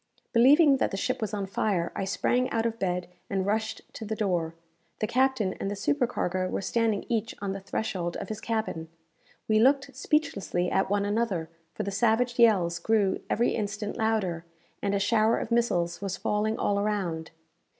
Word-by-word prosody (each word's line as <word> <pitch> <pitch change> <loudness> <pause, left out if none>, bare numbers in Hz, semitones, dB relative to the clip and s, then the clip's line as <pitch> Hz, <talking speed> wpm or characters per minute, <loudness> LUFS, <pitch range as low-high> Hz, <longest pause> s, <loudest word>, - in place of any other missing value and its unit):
Believing 275 +4 +6
that - - +1
the 195 - -4
ship 255 +4 -1
was 215 -2 -2
on 205 -2 -2
fire, 190 -3 -1
I 195 - -2
sprang 245 +6 +1
out 225 0 0
of 230 0 -2
bed 180 -1 -1 0.2
and 190 -1 0
rushed 220 +2 -1
to - - -7
the 220 0 -3
door. 175 -6 -1 0.4
The - - -1
captain 240 -4 +1
and 195 - -2
the 205 - -3
supercargo 200 -7 0
were - - -3
standing 225 -1 0
each 230 -1 -1
on 200 -1 -3
the 195 - -4
threshold 190 -3 -3
of - - -6
his 215 0 -5
cabin. 220 -8 -2 0.6
We 215 0 +4
looked 270 +2 +3
speechlessly 260 - 0
at 190 - +1
one 200 0 +1
another, 205 -6 -1 0.2
for - - -2
the 200 - -3
savage 240 +3 +1
yells 185 -7 +4
grew 205 +1 +2
every 235 +3 +2
instant 210 -1 -3
louder, 215 -7 0 0.4
and 200 0 0
a - - +1
shower 220 +2 +3
of 225 - -4
missiles 175 -8 +1
was 195 -1 -3
falling 215 +1 0
all 200 0 +1
around. 190 -6 -2
210 Hz, 180 wpm, -28 LUFS, 190-230 Hz, 0.6 s, Believing